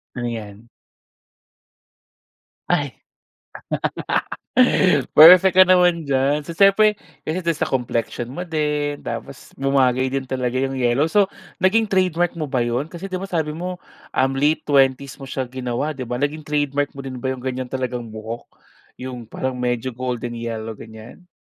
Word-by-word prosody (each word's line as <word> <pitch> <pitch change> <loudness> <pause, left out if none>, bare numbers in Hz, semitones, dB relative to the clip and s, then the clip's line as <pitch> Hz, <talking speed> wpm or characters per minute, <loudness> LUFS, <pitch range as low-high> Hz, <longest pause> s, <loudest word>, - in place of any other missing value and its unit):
Ano 120 -1 -3
yan? 110 -1 -7 2.0
Ay. - - -1 2.1
Perfect 180 +4 +9
ka 185 - +10
naman 180 -3 +4
dyan. 140 +2 +2
So 170 - -6
siyempre 205 +3 +5 0.3
ganito 170 +1 0
sa 160 - -2
complexion 120 -1 -2
mo 180 +6 -6
din. 150 -2 -1
Tapos 140 -2 -7
bumagay 130 -2 +2
din 135 +1 -2
talaga 130 -1 -3
yung 135 0 -1
yellow. 120 +3 +2
So 205 0 +4 0.3
naging 210 +4 +2
trademark 180 -2 +2
mo 155 - -2
ba 130 -3 0
yun? 120 +5 -1
Kasi 180 +3 -8
di 185 - -2
ba 195 - -5
sabi 160 -5 -1
mo 180 +4 -5 0.4
um 135 +1 +2
late 150 +3 +2
20s 135 -2 +2
mo 135 - -8
siya 130 0 -2
ginawa. 130 +3 -2
Di 130 -4 -6
ba 125 - -3
naging 145 +4 -2
trademark 145 -1 -1
mo 135 - -7
din 130 -2 -6
ba 130 - -3
yung 130 -1 -3
ganyan 130 -1 -3
talagang 125 -2 -4
buhok 110 +2 -7 0.5
yung 125 -3 -7
parang 130 +2 -4
medyo 125 +1 -1
golden 120 -1 -4
yellow 115 -1 -5
ganyan? 110 +11 -12
135 Hz, 150 wpm, -21 LUFS, 125-160 Hz, 2.1 s, ka